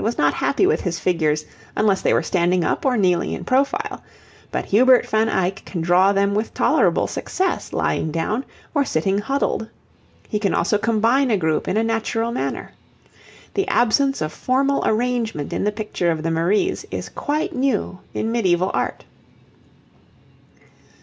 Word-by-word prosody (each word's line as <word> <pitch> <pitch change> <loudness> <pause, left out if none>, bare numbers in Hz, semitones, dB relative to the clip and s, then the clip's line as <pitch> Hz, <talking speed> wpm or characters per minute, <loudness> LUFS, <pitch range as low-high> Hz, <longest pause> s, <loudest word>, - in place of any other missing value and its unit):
was 230 +2 -1
not 145 0 +3
happy 290 - +1
with 410 - +2
his 175 -2 -2
figures 155 -4 0 0.3
unless 205 -3 +2
they - - +2
were - - +2
standing 180 0 +1
up - - 0
or 250 -2 +2
kneeling 180 -4 +1
in - - -5
profile, 280 +11 0 0.5
but - - -2
Hubert 250 +4 +5
van 220 +1 +1
Eyck 190 -1 -1
can 175 - -6
draw 180 +4 +4
them 200 0 +1
with 215 +2 -2
tolerable - - +2
success 375 -1 -2
lying 160 - -1
down, 210 - -1 0.3
or 290 -3 +2
sitting 195 - 0
huddled. 245 -2 -1 0.6
He 210 - -2
can 200 -2 0
also 210 - +1
combine 230 +5 +2
a 215 - +3
group 160 -3 0
in 200 - 0
a 220 - +2
natural 225 +1 -1
manner. 240 - -3 0.8
The 390 0 0
absence 270 - +2
of 155 0 -2
formal 275 - +1
arrangement 230 - -1
in - - -1
the 210 - +2
picture 210 -5 -2
of 160 -1 -1
the 165 - 0
Maries 190 - +1
is - - -5
quite 300 +1 -2
new 255 -8 -1 0.2
in 225 - -1
medieval 185 -5 +1
art. - - -2
215 Hz, 165 wpm, -21 LUFS, 180-250 Hz, 0.8 s, Hubert